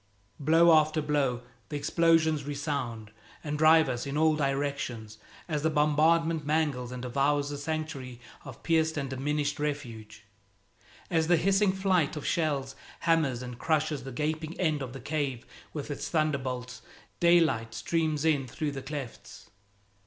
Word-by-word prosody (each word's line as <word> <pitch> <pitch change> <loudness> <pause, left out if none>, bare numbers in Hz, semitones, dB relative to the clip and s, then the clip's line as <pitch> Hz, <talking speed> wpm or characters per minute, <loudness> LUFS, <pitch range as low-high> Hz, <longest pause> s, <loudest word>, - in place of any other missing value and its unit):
Blow 165 +3 +5
after 155 0 +4
blow, 140 -5 0 0.3
the - - -5
explosions 160 0 +2
resound 140 -7 -4 0.3
and 150 -1 -3
drive 160 0 +6
us 125 +1 -3
in 140 +1 -3
all 155 0 +4
directions 135 -6 -2 0.3
as 150 -4 -1
the 160 - +2
bombardment 155 +2 +2
mangles 145 -5 0
and 125 0 -6
devours 140 +3 +1
the 145 - -4
sanctuary 145 -5 -4 0.2
of 130 -4 -11
pierced 160 -1 +1
and 135 -2 -3
diminished 145 +2 -1
refuge. 115 -7 -5 0.9
As 160 -1 +2
the 175 0 +4
hissing 195 +3 +3
flight 190 -6 +1
of 150 - -6
shells 140 -5 0 0.3
hammers 155 -7 +1
and 125 -1 -8
crushes 155 -4 0
the 135 - -7
gaping 155 +5 -3
end 155 -5 +1
of 130 -2 -5
the 135 - -7
cave 140 -2 -3 0.3
with 150 -1 -5
its 145 - -4
thunderbolts, 135 -6 -2 0.4
daylight 160 -10 +3
streams 155 +3 -1
in 145 -5 +2
through 145 +4 -3
the 135 -1 -6
clefts. 140 -4 -8
150 Hz, 145 wpm, -29 LUFS, 135-160 Hz, 0.9 s, drive